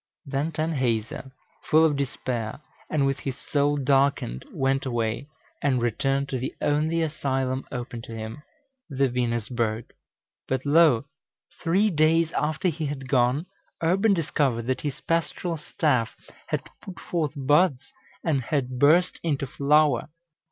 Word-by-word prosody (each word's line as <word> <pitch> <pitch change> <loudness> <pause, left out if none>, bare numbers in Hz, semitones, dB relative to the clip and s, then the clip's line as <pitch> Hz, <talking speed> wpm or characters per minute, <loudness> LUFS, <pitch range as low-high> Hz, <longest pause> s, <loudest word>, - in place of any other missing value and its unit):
Then 140 +3 -1
Tanhäuser, 130 -6 -1 0.3
full 160 +1 +5
of 150 -2 +2
despair, 125 -4 -3 0.3
and 150 -3 +2
with 135 0 0
his 135 -2 -4
soul 145 0 +1
darkened, 135 - +1
went 135 0 0
away, 120 +1 -2 0.3
and 130 -3 +2
returned 135 +4 0
to 130 - -2
the 130 - -4
only 155 +3 +1
asylum 135 -4 -1
open 120 -2 -5
to 115 - -9
him, 110 +5 -6 0.5
the 135 -1 +2
Venusberg. 120 -2 -1 0.6
But 130 +1 -1
lo! 145 -5 +5 0.6
three 195 +6 +3
days 160 +1 +3
after 155 +6 0
he 155 -1 -3
had 135 -2 -5
gone, 130 +4 +2 0.4
Urban 195 +5 +3
discovered 140 -8 0
that 130 +2 -1
his 145 -3 -4
pastoral 165 +1 -1
staff 150 - 0 0.3
had - - -1 0.2
put 185 -3 -9
forth 160 -5 -2
buds, 145 +1 +3 0.4
and 150 -5 +1
had 130 -3 -1
burst 165 +6 +4
into 145 -4 -1
flower. 140 0 +2
140 Hz, 135 wpm, -26 LUFS, 125-155 Hz, 0.6 s, full